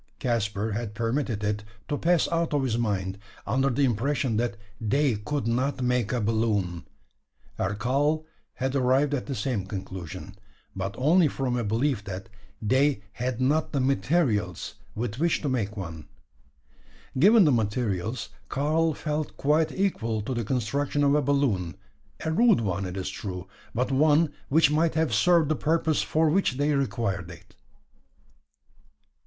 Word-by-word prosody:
Caspar 110 Hz, -3 st, -1 dB
had 105 Hz, 0 st, -4 dB
permitted 115 Hz, -1 st, -1 dB
it 105 Hz, 0 st, -1 dB, 0.2 s
to 145 Hz, -, -1 dB
pass 170 Hz, +3 st, +2 dB
out 165 Hz, -2 st, 0 dB
of 140 Hz, -, +1 dB
his 120 Hz, -4 st, 0 dB
mind, 100 Hz, -4 st, -1 dB, 0.3 s
under 135 Hz, +5 st, +1 dB
the 135 Hz, +2 st, +2 dB
impression 130 Hz, +1 st, 0 dB
that 120 Hz, 0 st, -1 dB, 0.3 s
they 135 Hz, +4 st, +2 dB
could 130 Hz, +7 st, -3 dB
not 130 Hz, +3 st, 0 dB
make 125 Hz, -3 st, +1 dB
a 125 Hz, -, 0 dB
balloon; 105 Hz, -6 st, 0 dB, 0.7 s
and 100 Hz, +2 st, -1 dB
Karl 145 Hz, +7 st, +1 dB, 0.3 s
had 130 Hz, +1 st, -2 dB
arrived 135 Hz, +2 st, +3 dB
at 135 Hz, -, -2 dB
the 135 Hz, -, -3 dB
same 105 Hz, -4 st, -2 dB
conclusion; 95 Hz, -1 st, -7 dB, 0.4 s
but 95 Hz, +1 st, -3 dB
only 160 Hz, +6 st, +4 dB
from 130 Hz, -3 st, -2 dB
a 120 Hz, -, 0 dB
belief 115 Hz, +2 st, 0 dB
that 95 Hz, +3 st, -6 dB, 0.3 s
they 130 Hz, +1 st, +2 dB
had 120 Hz, +4 st, -3 dB
not 150 Hz, +6 st, +1 dB
the 140 Hz, -, +1 dB
materials 120 Hz, -, 0 dB, 0.2 s
with 115 Hz, +1 st, -3 dB
which 170 Hz, +1 st, +2 dB
to 145 Hz, -, 0 dB
make 110 Hz, -5 st, -2 dB
one. 80 Hz, -5 st, -6 dB, 1.1 s
Given 205 Hz, -, +7 dB
the 150 Hz, -, +4 dB
materials, 110 Hz, -1 st, -1 dB, 0.2 s
Karl 155 Hz, +3 st, +1 dB
felt 150 Hz, 0 st, -3 dB
quite 155 Hz, +2 st, +2 dB
equal 115 Hz, -, -1 dB
to 130 Hz, -, -3 dB
the 120 Hz, -1 st, -1 dB
construction 135 Hz, +5 st, 0 dB
of 140 Hz, 0 st, +4 dB
a 150 Hz, -, +4 dB
balloon 125 Hz, -11 st, +1 dB, 0.5 s
a 160 Hz, -, 0 dB
rude 225 Hz, -, +4 dB
one, 100 Hz, -2 st, -1 dB
it 90 Hz, +1 st, -6 dB
is 95 Hz, -, -3 dB
true; 95 Hz, -1 st, -6 dB, 0.3 s
but 125 Hz, +3 st, 0 dB
one 150 Hz, +3 st, +4 dB, 0.2 s
which 155 Hz, +1 st, +4 dB
might 160 Hz, +2 st, +2 dB
have 160 Hz, -6 st, +1 dB
served 160 Hz, +9 st, +4 dB
the 155 Hz, -, +2 dB
purpose 160 Hz, 0 st, +1 dB
for 160 Hz, +1 st, +2 dB
which 190 Hz, -5 st, +2 dB
they 145 Hz, +3 st, +1 dB
required 100 Hz, -9 st, -1 dB
it. 85 Hz, +2 st, -13 dB
125 Hz, 155 wpm, -26 LUFS, 105-145 Hz, 1.1 s, Given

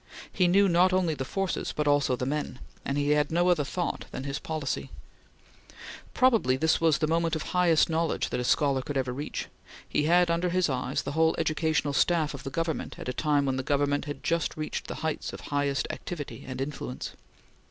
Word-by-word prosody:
He 180 Hz, -, +3 dB
knew 195 Hz, +3 st, +5 dB
not 180 Hz, +1 st, +4 dB
only 180 Hz, -3 st, +2 dB
the 140 Hz, -, -3 dB
forces 195 Hz, +7 st, -2 dB
but 150 Hz, -1 st, 0 dB
also 145 Hz, -3 st, +3 dB
the 125 Hz, -, -3 dB
men, 145 Hz, -2 st, -2 dB, 0.3 s
and 140 Hz, -, -2 dB
he 145 Hz, 0 st, +1 dB
had 150 Hz, -1 st, +3 dB
no 175 Hz, +2 st, +3 dB
other 170 Hz, -5 st, +3 dB
thought 175 Hz, +5 st, -3 dB
than 130 Hz, -, -6 dB
his 140 Hz, 0 st, -3 dB
policy. 155 Hz, -4 st, -3 dB, 1.3 s
Probably 225 Hz, -, +4 dB
this 160 Hz, +3 st, +2 dB
was 160 Hz, -2 st, +4 dB
the 155 Hz, -, +1 dB
moment 165 Hz, +1 st, +1 dB
of 155 Hz, -, -3 dB
highest 175 Hz, -3 st, +3 dB
knowledge 165 Hz, 0 st, 0 dB
that -, -, -1 dB
a -, -, -1 dB
scholar 135 Hz, +1 st, +2 dB
could 140 Hz, +2 st, -4 dB
ever 130 Hz, -2 st, -1 dB
reach. 145 Hz, +4 st, -4 dB, 0.4 s
He 150 Hz, -, 0 dB
had 175 Hz, +1 st, +4 dB
under 170 Hz, +2 st, +1 dB
his 180 Hz, -1 st, +1 dB
eyes 130 Hz, -2 st, -1 dB
the 140 Hz, -, -4 dB
whole 160 Hz, +2 st, +3 dB
educational 155 Hz, -2 st, 0 dB
staff 155 Hz, 0 st, +2 dB
of 140 Hz, -, -7 dB
the 135 Hz, -, -5 dB
Government 165 Hz, +3 st, -3 dB
at -, -, -6 dB
a -, -, -2 dB
time 145 Hz, 0 st, +1 dB
when 135 Hz, -1 st, 0 dB
the -, -, 0 dB
Government 145 Hz, +1 st, 0 dB
had 145 Hz, -1 st, -6 dB
just 170 Hz, -1 st, 0 dB
reached 155 Hz, 0 st, -4 dB
the -, -, -5 dB
heights 160 Hz, -, -2 dB
of -, -, -7 dB
highest 145 Hz, -1 st, -1 dB
activity 155 Hz, -5 st, -7 dB
and 130 Hz, 0 st, -5 dB
influence. 135 Hz, -2 st, -5 dB
150 Hz, 205 wpm, -28 LUFS, 140-170 Hz, 1.3 s, knew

